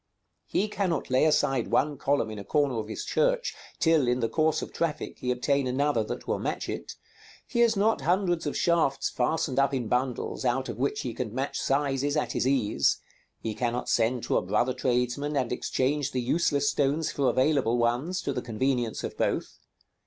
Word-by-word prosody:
He 205 - 0
cannot 185 -10 -2
lay 130 +4 +4
aside 135 -5 +2
one 145 +1 +1
column 135 -5 0
in 105 - -6
a - - -6
corner 140 -1 +1
of 110 - -4
his 110 - -5
church - - +1 0.2
till, 160 -5 +3
in 125 +1 +2
the 115 - +1
course 155 +4 +1
of - - -8
traffic, 165 -3 -3
he 125 - -3
obtain 130 +2 +1
another 130 -2 +1
that - - -6
will - - 0
match - - -3
it; - - -5 0.5
he 235 - -3
has 230 -3 +4
not 220 +3 +2
hundreds 175 -2 +1
of 145 - -2
shafts 165 -5 +1
fastened 135 +1 0
up 140 0 +2
in 125 -4 -2
bundles, 125 +3 -1
out 130 +1 0
of 120 0 -6
which 140 +2 0
he 120 - -4
can 120 -2 -4
match 135 +2 -2
sizes 140 +1 0
at 150 - 0
his - - 0
ease; 125 -6 +2 0.5
he 110 - -2
cannot 120 +2 -2
send 120 +1 +1
to - - +1
a - - +2
brother 125 +1 +1
tradesman 125 +4 0
and 130 -3 0
exchange 140 +3 -1
the 130 - 0
useless 145 +2 +1
stones 145 +3 +1
for 140 -2 +1
available 130 -3 +2
ones, 125 +10 0
to 140 - -1
the 125 - -2
convenience 120 0 -1
of - - -4
both. - - -1
135 Hz, 195 wpm, -27 LUFS, 125-150 Hz, 0.5 s, lay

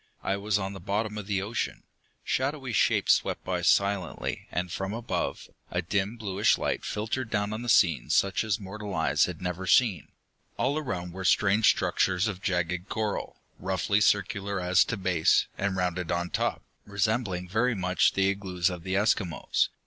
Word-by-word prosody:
I 95 - 0
was 100 +1 0
on 95 -1 -3
the 95 - -8
bottom 105 +3 -2
of 100 - -8
the 100 -2 0
ocean. 110 +4 -3 0.4
Shadowy 135 -2 -1
shapes - - +4
swept - - -1
by 90 -1 -2
silently, 100 +1 0
and 90 -1 -2
from 95 +3 -3
above, 120 0 -3 0.2
a 90 0 -2
dim 100 +5 -1
bluish 105 -1 +2
light - - -2
filtered 110 +3 -3
down 105 -1 -1
on 110 +2 -4
a 120 - -4
scene 80 - +3
such 100 +1 +2
as 110 -2 -1
mortal 100 0 -6
eyes 80 0 +3
have - - -7
never 90 +1 -3
seen. 100 - +3 0.5
All 145 +4 +1
around 90 - -4
were 95 +1 -6
strange 105 +3 +3
structures 95 +2 +1
of 100 -3 -4
jagged 90 0 -1
coral, 110 -2 -3 0.2
roughly 95 +2 0
circular 100 -1 +1
as 90 0 +4
to 115 - -3
base, 90 -4 +3
and 100 -1 -1
rounded 90 -1 -1
on 85 0 -1
top, - - -1 0.2
resembling 100 -2 -1
very 115 +6 +1
much 90 -1 +2
the 95 0 +2
igloos 95 -2 -1
of 90 -1 -6
the 95 +2 -3
Eskimos. 95 -6 +1
95 Hz, 170 wpm, -28 LUFS, 90-105 Hz, 0.5 s, shapes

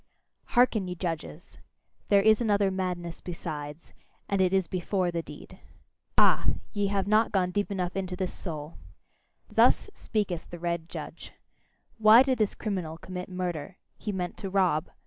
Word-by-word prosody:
Hearken, 230 -6 +4
ye 180 - -4
judges! 170 -1 -5 0.5
There 200 -1 +5
is 220 +2 +5
another 205 -3 +2
madness 180 -3 -3
besides, 155 -3 -6 0.3
and 200 -1 +1
it 185 -1 +3
is 190 -1 +2
BEFORE 185 0 -1
the 170 -1 -1
deed. - - -12 0.6
Ah! - - +5 0.3
ye 205 -2 +1
have 195 -1 0
not 215 +2 +3
gone 180 -2 +1
deep 205 +3 -1
enough 180 -3 -2
into 185 -1 -2
this 185 0 -3
soul! 155 -3 -7 0.7
Thus - - +3
speaketh 195 -7 -2
the 175 - -7
red 170 -1 -3
judge: - - -8 0.7
"Why 220 +3 +8
did 260 -2 0
this 215 -2 +1
criminal 180 -7 -3
commit 180 +2 -7
murder? 180 -1 -4 0.2
He 210 - -4
meant 180 -2 -3
to 195 - -5
rob." 180 -5 +2
185 Hz, 155 wpm, -28 LUFS, 175-200 Hz, 0.7 s, Why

